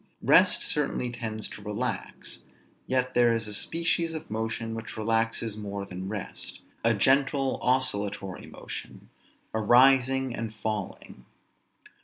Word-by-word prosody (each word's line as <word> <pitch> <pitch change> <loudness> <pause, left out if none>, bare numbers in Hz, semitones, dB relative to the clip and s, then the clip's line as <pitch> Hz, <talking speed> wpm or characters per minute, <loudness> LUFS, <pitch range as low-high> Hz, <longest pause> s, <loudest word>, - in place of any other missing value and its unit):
Rest - - +5
certainly 125 - 0
tends 110 -2 -4
to - - -10
relax: 105 +1 -4 0.5
yet 130 0 0
there 120 -1 +5
is 115 -1 0
a 105 - -5
species 165 - +1
of 155 - -7
motion 115 +1 -2
which 115 -2 -7
relaxes 115 0 0
more 100 -2 -5
than 95 0 -6
rest; 105 -2 -5 0.2
a 115 0 +4
gentle 135 +4 +2
oscillatory 100 -7 0
motion, - - -9 0.4
a 110 - 0
rising 130 +2 +5
and 110 -2 -5
falling. 105 - -5
115 Hz, 125 wpm, -28 LUFS, 105-130 Hz, 0.5 s, Rest